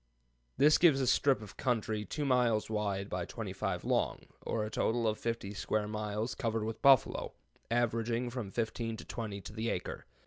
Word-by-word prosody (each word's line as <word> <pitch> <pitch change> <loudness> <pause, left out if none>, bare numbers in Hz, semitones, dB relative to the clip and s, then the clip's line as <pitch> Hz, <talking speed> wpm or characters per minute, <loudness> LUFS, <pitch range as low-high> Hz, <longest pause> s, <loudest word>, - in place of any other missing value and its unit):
This 150 +3 +6
gives 160 -6 +6
a 130 - +1
strip 130 -2 +3
of 95 -2 -12
country 110 -4 0
2 150 - -3
miles 120 -5 +2
wide 100 -2 -1
by 90 -3 -2
25 - - -4
long, - - +1 0.2
or 110 -2 -1
a 105 - -6
total 115 0 +1
of 110 0 0
50 115 -4 -3
square 105 0 -1
miles 105 +1 -2
covered 115 -3 -1
with 110 +1 -4
buffalo, 135 -2 +4 0.4
averaging 115 +1 0
from 120 -5 -4
fifteen 115 +1 -2
to - - -9
twenty 105 -4 -5
to 105 - -9
the 110 +1 -2
acre. - - -4
115 Hz, 175 wpm, -32 LUFS, 105-120 Hz, 0.4 s, This